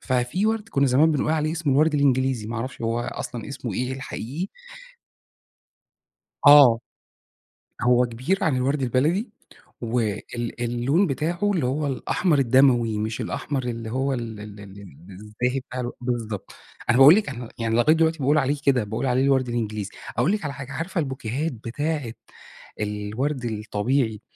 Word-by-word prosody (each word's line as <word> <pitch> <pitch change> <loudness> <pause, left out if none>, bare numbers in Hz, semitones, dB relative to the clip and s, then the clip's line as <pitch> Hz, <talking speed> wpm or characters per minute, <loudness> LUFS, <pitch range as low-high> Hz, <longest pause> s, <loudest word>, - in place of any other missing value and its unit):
ففي 130 - 0
وَرْد 220 0 -1
كُنّا 140 -8 +2
زمان 140 +5 +4
بنقول 150 +1 0
عليه 155 0 0
اسمه 160 -4 0
الوَرْد 155 +3 +3
الإنجليزي، 130 -5 +1
ما 115 +2 -4
أعرفش 130 +4 -5
هو 115 +1 0
أصلًا 120 -1 -5
اسمه 130 -4 -5
إيه 125 +4 -2
الحقيقي. 135 - -5 2.0
آه. 140 -6 +8 1.0
هو 125 0 +4
كبير 130 +12 -1
عن 150 -5 +2
الوَرْد 135 +3 0
البلدي 150 - +1 0.5
وال 120 0 -3
اللون 120 +10 +1
بتاعه 170 +7 -1
اللي 160 -9 0
هو 145 +4 -1
الأحمر 145 - 0
الدَمَوي 120 -4 +3
مش 110 +1 -3
الأحمر 140 -2 -3
اللي 115 -2 -4
هو 135 +3 0
ال 115 -4 -5
ال 105 -1 -10
ال 100 0 -11 0.3
الزاهي 105 +7 -3
بتاع 125 0 -7
الو 120 0 -4
بالضبط. 115 -4 -4 0.4
أنا 120 - +4
باقول 140 +4 +10
لِك 210 -3 +1
أنا 125 -3 -6
يعني 115 -1 -1
لغاية 135 +7 +5
دلوقتي 160 0 +2
باقول 145 +2 +2
عليه 140 0 +1
كده، 130 -5 +3
باقول 110 +5 -3
عليه 130 +1 +2
الوَرْد 135 -2 +2
الإنجليزي. 110 -4 -3 0.3
أقول 120 - +2
لِك 210 -5 -2
على 145 - -3
حاجة، 135 +1 -8
عارفة 165 +6 -4
البوكيهات 135 0 -2
بتاعة 130 +3 -3 0.7
الوَرْد 105 +7 -3
الطبيعي 110 +1 -1
130 Hz, 155 wpm, -24 LUFS, 115-145 Hz, 2.0 s, باقول